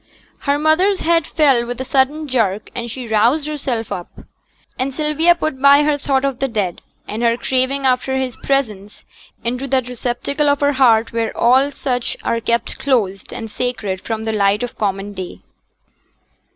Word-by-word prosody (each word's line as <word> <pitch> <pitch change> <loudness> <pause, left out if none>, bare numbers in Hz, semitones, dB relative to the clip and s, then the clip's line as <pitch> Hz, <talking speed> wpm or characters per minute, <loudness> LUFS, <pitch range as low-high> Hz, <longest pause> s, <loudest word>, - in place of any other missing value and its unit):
Her 285 - +3
mother's 345 +6 +2
head 330 -1 +2
fell 275 -7 +3
with 245 +1 -5
a 260 - -3
sudden 285 +4 +1
jerk, 220 -6 -1
and 240 -1 -4
she 245 +1 -6
roused 235 +7 +2
herself 265 -7 -3
up; 175 - -5 0.7
and 260 +2 -1
Sylvia 305 +4 +2
put 310 -5 -3
by 280 +1 +7
her 295 0 +2
thought 275 -1 0
of 270 -2 -2
the 270 - +1
dead, 205 -8 -2 0.3
and 215 +2 -4
her 235 0 +2
craving 265 +2 0
after 260 +1 +1
his 260 -2 -2
presence, 215 -7 -2 0.4
into 250 +3 -2
that 260 -2 0
receptacle 250 +4 -1
of 285 0 +2
her 285 0 +3
heart 230 -4 +3
where 230 -1 -2
all 260 +4 +4
such 250 -4 -3
are 230 0 0
kept 235 +1 -1
closed 210 -8 0
and 225 -2 -7
sacred 210 -7 -3
from 220 -1 -4
the 220 0 -2
light 205 +1 +2
of 245 - -5
common 200 0 -2
day. 185 -2 -7
255 Hz, 175 wpm, -18 LUFS, 225-280 Hz, 0.7 s, by